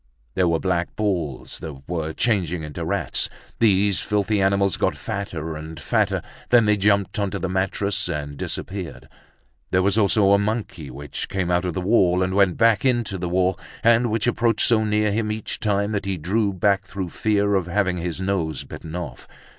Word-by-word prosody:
There 90 -1 +2
were 85 -1 +2
black 90 -1 -1
balls 85 -10 -2
that 70 -3 -9
were 80 -2 -2
changing 90 -5 0
into 75 -1 -5
rats. - - -1 0.3
These 100 -3 +3
filthy 105 0 0
animals 100 -1 +2
got - - 0
fatter 80 -5 -4
and 80 +1 -8
fatter, - - 0 0.3
then 120 -2 +6
they 105 0 +4
jumped 100 0 +1
onto 100 -1 -1
the 95 0 -2
mattress 95 +1 0
and 75 -3 -4
disappeared. 90 +4 -5 0.6
There 95 0 +2
was 100 +3 +3
also 100 -1 +4
a 100 - +5
monkey 100 - -3
which 70 +3 -5
came 90 -2 -1
out 90 +1 +1
of 90 - -2
the 95 - -1
wall, 90 -2 +3
and 95 0 -1
went 95 -2 +3
back 115 -3 +4
into 120 -7 +1
the 90 0 -3
wall, 95 +1 +1 0.2
and 115 +1 +4
which 110 0 0
approached 115 -2 +2
so 110 -2 +3
near 105 0 +1
him 105 +1 0
each 110 0 -4
time, 100 -1 0
that 100 -2 -2
he 95 -1 -2
drew 100 +6 0
back 95 +1 +2
through 95 -3 -5
fear 100 +1 +1
of 95 -3 +1
having 90 -1 0
his 85 0 -3
nose 95 -5 -1
bitten 80 +1 -9
off. 80 -9 -6
95 Hz, 185 wpm, -23 LUFS, 90-105 Hz, 0.6 s, then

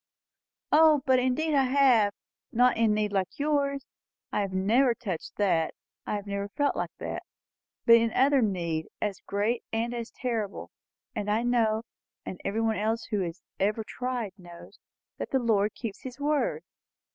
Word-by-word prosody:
"O, 305 -2 +6
but 260 -1 +4
indeed 260 +5 +1
I 275 -2 +4
have. 255 -6 +4 0.4
Not 250 +2 +4
in 220 -2 +3
need 210 -1 0
like 190 -2 -1
yours 280 -2 0 0.5
I - - 0
have 195 -1 -2
never 230 +7 +3
touched 190 -9 -5
that 175 -6 +1 0.3
I 210 - -1
never 200 0 -3
felt 285 +6 0
like - - -2
that; - - -4 0.6
but 230 0 +9
in 230 -1 +1
other 275 +1 +4
need, 170 -7 -1
as 205 -2 -2
great 210 +4 0
and 230 +2 -1
as 235 -1 -4
terrible. 225 -5 -4 0.4
And 210 -2 -2
I 215 +3 +2
know, 225 -2 +2 0.4
and 185 - -7
everybody 220 +2 0
else 220 +2 0
who 210 - +1
has 175 -1 -4 0.2
ever 210 +3 +1
tried 245 -2 -3
knows, 175 -1 -13 0.4
that - - -4
the 270 - +2
Lord 215 -4 +1
keeps 220 -4 -6
his 260 +1 -8
word." 300 +12 0
225 Hz, 160 wpm, -28 LUFS, 205-255 Hz, 0.6 s, but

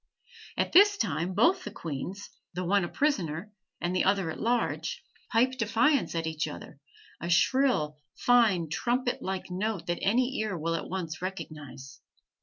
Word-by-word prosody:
At - - 0
this 405 +2 +7
time 185 - -1
both 365 - +4
the - - -5
queens, 170 +6 -6 0.2
the 180 - -2
one 200 +2 +3
a - - -1
prisoner 200 - -1 0.3
and 175 +1 -1
the 185 - +3
other 195 -4 +2
at - - -8
large, 245 - -1 0.3
pipe 245 +3 +4
defiance 230 - +2
at 165 -1 -1
each 160 -1 -2
other, - - -9 0.4
a 170 - -4
shrill, 170 - +2 0.2
fine, 220 -9 +4
trumpet 245 - -1
like 190 -1 -4
note 200 0 -2
that 175 0 -2
any 245 +6 +1
ear 215 -4 -1
will 165 +1 -1
at 165 - -3
once 175 -3 -4
recognize. 150 -7 -7
190 Hz, 160 wpm, -29 LUFS, 165-245 Hz, 0.4 s, this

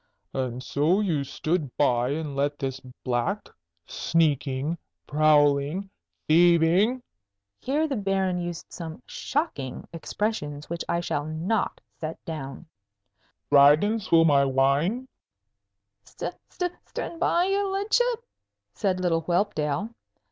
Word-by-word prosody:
"And 130 -1 -3
so 150 +9 +2
you 170 -9 +1
stood 150 0 -2
by 125 -3 +2
and 150 -1 -3
let 145 +1 0
this 135 -2 -3 0.2
black, 130 - -1 0.4
sneaking, 150 - 0 0.3
prowling, 150 +4 +3 0.4
thieving" 175 +9 +4 0.6
(here 295 +4 0
the 275 -4 -2
Baron 195 -2 0
used 175 -1 -5
some 160 -7 -7
shocking 210 - -3
expressions 160 -4 -3
which 170 - -2
I 170 - +1
shall 155 -4 -2
not 170 +8 -1 0.2
set 160 0 -4
down) 150 -1 -6 0.9
"Dragon 150 +10 +6
swill 165 -5 +4
my 140 -3 +5
wine?" 140 - +1 1.0
"St - - -6 0.2
st 355 -1 -3
stood 335 - -5
by, 345 +1 +3
your 395 +1 +1
ludship?" 465 +4 +1 0.5
said 190 -3 0
little 170 -3 +1
Whelpdale. 175 +2 0
165 Hz, 110 wpm, -26 LUFS, 145-205 Hz, 1.0 s, Dragon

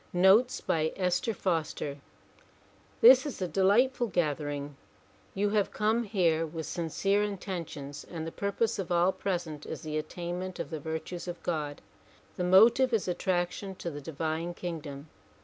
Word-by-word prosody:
Notes 190 +8 +5
by 160 -1 0
Esther 180 +4 0
Foster 160 -6 -2 1.0
THIS 465 -9 +8
is 285 - -6
a 185 - -1
delightful 220 +9 +3
gathering; 145 -5 -2 0.6
you 205 +1 +1
have 210 -2 +2
come 220 +3 +1
here 170 -6 +2
with 160 0 -5
sincere 195 +5 0
intentions 175 -8 -5
and 165 -2 -5
the 165 - -5
purpose 200 +3 -1
of 185 -2 -4
all 175 +2 +4
present 170 -7 -4
is - - -6
the 155 -1 -2
attainment 175 +3 -5
of - - -5
the 160 - -3
virtues 160 +4 -5
of 175 -1 -6
God. 150 -4 -3 0.5
The 180 - -2
motive 230 +8 +6
is 220 -4 +1
attraction 180 +1 -1
to 170 - -5
the 145 -1 -7
divine 160 +3 -3
kingdom. 155 -5 -6
175 Hz, 150 wpm, -29 LUFS, 160-200 Hz, 1.0 s, THIS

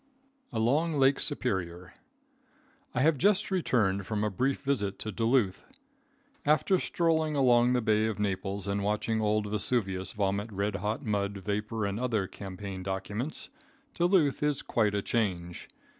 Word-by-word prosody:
Along 140 +9 +1
Lake 135 0 +4
Superior. 90 - -2 1.0
I 125 - +2
have 150 -1 +3
just 205 +5 +2
returned 105 - +1
from 105 -1 -1
a 105 - 0
brief 130 +7 -1
visit 105 -8 -1
to 110 - -4
Duluth. 115 -2 +1 0.8
After 165 +5 +3
strolling 160 -2 +1
along 125 -2 +4
the 125 -2 +1
Bay 110 0 +2
of 110 - -3
Naples 100 -1 -2
and 100 0 -1
watching 105 +2 0
old 105 0 +1
Vesuvius 100 -2 -1
vomit 100 +1 -1
red 100 0 -1
hot 105 +8 -3
mud, 100 -2 -1
vapor 105 +2 -2
and 100 +2 -2
other 115 -6 0
campaign 95 0 -7
documents, 100 +9 -4 0.4
Duluth 175 -5 +2
is 150 -1 0
quite 105 -3 +1
a 100 - -1
change. 90 -7 -2
105 Hz, 145 wpm, -29 LUFS, 100-130 Hz, 1.0 s, Lake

